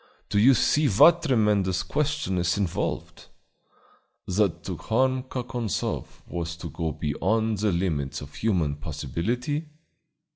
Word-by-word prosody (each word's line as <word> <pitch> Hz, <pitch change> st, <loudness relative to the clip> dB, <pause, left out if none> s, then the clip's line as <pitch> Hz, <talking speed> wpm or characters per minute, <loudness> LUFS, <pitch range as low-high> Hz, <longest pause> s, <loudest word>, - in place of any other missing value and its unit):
Don't 100 Hz, -, +2 dB
you 130 Hz, +4 st, +7 dB
see 150 Hz, +6 st, +3 dB
what 165 Hz, -, +6 dB
a -, -, -1 dB
tremendous 105 Hz, -, +2 dB
question 150 Hz, -10 st, -1 dB
is 90 Hz, +2 st, +1 dB
involved? 95 Hz, -5 st, -3 dB, 1.0 s
That 95 Hz, -1 st, 0 dB
to -, -, -4 dB
harm 130 Hz, +3 st, +1 dB
Kakonzoff 125 Hz, -4 st, -4 dB
was 85 Hz, -1 st, -4 dB
to 85 Hz, -2 st, -8 dB
go 80 Hz, +1 st, -2 dB
beyond 110 Hz, +9 st, 0 dB
the 105 Hz, -1 st, +2 dB
limits 80 Hz, -6 st, -1 dB
of 75 Hz, 0 st, -10 dB
human 85 Hz, -10 st, 0 dB
possibility?" 105 Hz, -, -3 dB
105 Hz, 125 wpm, -26 LUFS, 85-125 Hz, 1.0 s, you